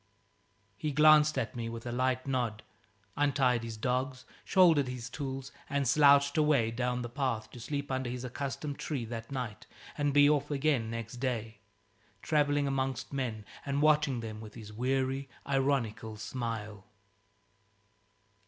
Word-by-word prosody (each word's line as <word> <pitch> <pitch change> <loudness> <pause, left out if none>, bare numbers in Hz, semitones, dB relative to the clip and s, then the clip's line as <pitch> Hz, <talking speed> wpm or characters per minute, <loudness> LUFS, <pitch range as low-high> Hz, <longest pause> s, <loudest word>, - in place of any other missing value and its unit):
He 150 +6 -2
glanced 155 +1 +6
at 115 - -2
me 115 -1 -3
with 115 0 -7
a 120 - -3
light 130 +1 0
nod, 120 -5 -1 0.5
untied 130 -4 +2
his 115 -1 -6
dogs, 130 +2 -1 0.2
shouldered 165 -8 +5
his 125 -1 -6
tools, 135 -1 -5 0.2
and 140 -1 0
slouched 140 +2 +5
away 145 -7 +3
down 125 +1 -1
the - - -3
path, 120 -3 -2
to 125 - -10
sleep 140 +3 -4
under 130 -1 -1
his 125 0 -5
accustomed 140 +3 -4
tree 135 -7 -3
that 115 +2 -7
night 120 -6 -5 0.3
and 145 -2 +1
be 145 0 +6
off 145 -1 +2
again, 140 -5 +1
next 115 +1 -5
day, 115 -4 -3 0.6
travelling 145 -2 +2
amongst 135 -1 -2
men 115 -6 -3 0.2
and 140 +1 0
watching 150 -5 +3
them 110 -1 -6
with 110 -1 -10
his 105 -1 -10
weary 135 +3 -1 0.2
ironical 130 -6 0
smile. 110 -3 -5
130 Hz, 145 wpm, -31 LUFS, 115-140 Hz, 0.6 s, glanced